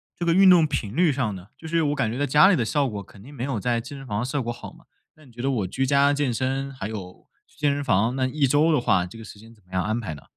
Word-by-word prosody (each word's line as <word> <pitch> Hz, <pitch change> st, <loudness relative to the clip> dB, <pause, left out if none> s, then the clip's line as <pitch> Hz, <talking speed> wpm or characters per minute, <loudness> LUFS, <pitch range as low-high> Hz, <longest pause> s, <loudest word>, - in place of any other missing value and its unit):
这 175 Hz, -, -4 dB
个 170 Hz, -, +3 dB
运 190 Hz, 0 st, +7 dB
动 175 Hz, -3 st, +6 dB
频 120 Hz, -7 st, -4 dB
率 170 Hz, -2 st, +3 dB
上 125 Hz, -6 st, -1 dB
呢？ 95 Hz, +1 st, -11 dB
就 160 Hz, -, -10 dB
是 165 Hz, +1 st, +1 dB
我 145 Hz, -1 st, 0 dB
感 110 Hz, -5 st, -1 dB
觉 120 Hz, -, -4 dB
在 145 Hz, -, +1 dB
家 150 Hz, +6 st, +6 dB
里 195 Hz, -, +4 dB
的 125 Hz, -, 0 dB
效 140 Hz, +3 st, +1 dB
果， 105 Hz, -3 st, -5 dB
肯 100 Hz, -, -17 dB
定 140 Hz, -, -13 dB
没 125 Hz, -4 st, -6 dB
有 130 Hz, -5 st, -2 dB
在 120 Hz, +1 st, 0 dB
健 140 Hz, +4 st, -9 dB
身 135 Hz, -, -10 dB
房 105 Hz, -4 st, -3 dB
的 120 Hz, -, -2 dB
效 140 Hz, +2 st, -2 dB
果 120 Hz, -, -3 dB
好 120 Hz, -, -10 dB
嘛。 -, -, -20 dB, 0.3 s
那 155 Hz, -, -19 dB
你 130 Hz, -, -18 dB
觉 120 Hz, +1 st, -9 dB
得 135 Hz, -, 0 dB
我 110 Hz, -8 st, -1 dB
居 135 Hz, +8 st, -1 dB
家 140 Hz, +1 st, +4 dB
健 145 Hz, -3 st, 0 dB
身， 135 Hz, +3 st, -2 dB
还 120 Hz, -7 st, -6 dB
有 95 Hz, -4 st, -9 dB, 0.2 s
去 -, -, -28 dB
健 150 Hz, -1 st, +1 dB
身 145 Hz, -, -3 dB
房， 115 Hz, +1 st, +1 dB
那 130 Hz, -1 st, 0 dB
1 145 Hz, +2 st, 0 dB
周 145 Hz, +5 st, +3 dB
的 155 Hz, -, +3 dB
话， 95 Hz, -7 st, +2 dB
这 100 Hz, -, -12 dB
个 115 Hz, -, -10 dB
时 105 Hz, -, -12 dB
间 115 Hz, +2 st, -15 dB
怎 105 Hz, -3 st, -25 dB
么 90 Hz, -, -20 dB
样 90 Hz, -, 0 dB
安 110 Hz, +2 st, -1 dB
排 110 Hz, -9 st, -5 dB
呢？ 70 Hz, -, -12 dB
130 Hz, 355 characters per minute, -24 LUFS, 110-145 Hz, 0.3 s, 运